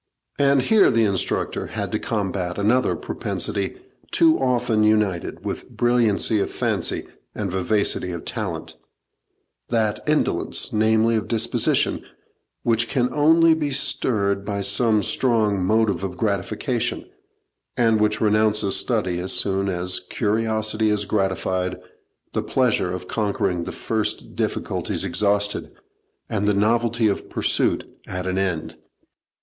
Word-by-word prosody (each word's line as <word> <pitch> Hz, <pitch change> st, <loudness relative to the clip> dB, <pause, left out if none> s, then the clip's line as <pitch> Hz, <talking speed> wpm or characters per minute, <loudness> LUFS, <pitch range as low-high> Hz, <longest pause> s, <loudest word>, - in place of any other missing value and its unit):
And 140 Hz, -2 st, +4 dB
here 215 Hz, +6 st, +5 dB
the 115 Hz, -1 st, +3 dB
instructor 100 Hz, -3 st, -1 dB
had -, -, -4 dB
to -, -, -1 dB
combat 95 Hz, -4 st, -2 dB
another 110 Hz, +6 st, +2 dB
propensity -, -, -3 dB, 0.3 s
too 325 Hz, -1 st, +4 dB
often 125 Hz, -3 st, +1 dB
united 105 Hz, -5 st, 0 dB
with -, -, -4 dB
brilliancy 115 Hz, -3 st, +2 dB
of -, -, -1 dB
fancy -, -, -1 dB, 0.3 s
and 100 Hz, -4 st, -3 dB
vivacity 95 Hz, -1 st, 0 dB
of 85 Hz, -2 st, -6 dB
talent -, -, -5 dB, 0.9 s
that 110 Hz, -3 st, +1 dB
indolence, 150 Hz, 0 st, 0 dB
namely, 110 Hz, +1 st, +3 dB
of 105 Hz, -, -3 dB
disposition, 115 Hz, -2 st, +1 dB, 0.6 s
which 115 Hz, 0 st, +1 dB
can 125 Hz, 0 st, 0 dB
only 160 Hz, +2 st, +5 dB
be 155 Hz, -2 st, -1 dB
stirred 100 Hz, -7 st, 0 dB
by 100 Hz, -1 st, -3 dB
some 105 Hz, +2 st, +2 dB
strong 110 Hz, -5 st, +1 dB
motive 110 Hz, 0 st, +1 dB
of 90 Hz, -2 st, -4 dB
gratification, 100 Hz, -3 st, -2 dB, 0.7 s
and 115 Hz, -3 st, +3 dB
which 105 Hz, 0 st, +2 dB
renounces 105 Hz, -1 st, +2 dB
study 95 Hz, -8 st, 0 dB
as 90 Hz, +1 st, 0 dB
soon 95 Hz, 0 st, 0 dB
as 90 Hz, 0 st, 0 dB
curiosity 110 Hz, 0 st, 0 dB
is 105 Hz, -1 st, +1 dB
gratified, 95 Hz, -2 st, -1 dB, 0.5 s
the -, -, 0 dB
pleasure 120 Hz, -8 st, +1 dB
of 90 Hz, 0 st, -6 dB
conquering 100 Hz, -5 st, -1 dB
the -, -, -5 dB
first 110 Hz, -2 st, -3 dB
difficulties -, -, -2 dB
exhausted, 105 Hz, 0 st, 0 dB, 0.6 s
and 100 Hz, +1 st, -1 dB
the 105 Hz, -, +3 dB
novelty 115 Hz, +2 st, +2 dB
of 100 Hz, -, -2 dB
pursuit -, -, 0 dB, 0.2 s
at 90 Hz, 0 st, -4 dB
an 95 Hz, +1 st, -1 dB
end. 90 Hz, -5 st, -2 dB
105 Hz, 125 wpm, -22 LUFS, 100-115 Hz, 0.9 s, here